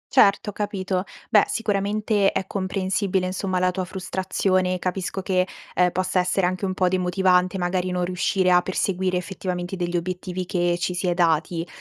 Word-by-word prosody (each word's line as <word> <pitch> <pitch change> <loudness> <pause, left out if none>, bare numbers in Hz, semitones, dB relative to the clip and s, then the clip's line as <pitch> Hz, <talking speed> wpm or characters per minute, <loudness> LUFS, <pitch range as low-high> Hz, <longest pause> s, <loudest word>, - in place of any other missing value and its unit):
Certo, 205 +1 +5
ho - - -22
capito. 195 -2 -2 0.3
Beh, 210 - +7
sicuramente, 205 -1 +1
è 190 - -2
comprensibile, 190 0 -1
insomma, 185 0 -2
la 180 0 +2
tua 185 +1 -3
frustrazione, 185 0 -1
capisco 185 +1 -3
che, 185 -1 +1 0.3
ehm, 180 0 +3
possa 185 +1 0
essere 180 +1 +1
anche 185 +2 -1
un 185 -1 -2
po' 185 -2 +2
demotivante, 185 0 +2
magari 180 0 -1
non 180 -1 0
riuscire 185 +1 +1
a 180 0 +6
perseguire, 185 0 -1
effettivamente, 180 0 -4
degli 175 -1 -1
obiettivi 180 +1 -4
che 175 -1 +1
ci 180 0 -1
si 180 +1 -2
è 175 - +1
dati. 165 0 +1
185 Hz, 170 wpm, -24 LUFS, 180-190 Hz, 0.3 s, Beh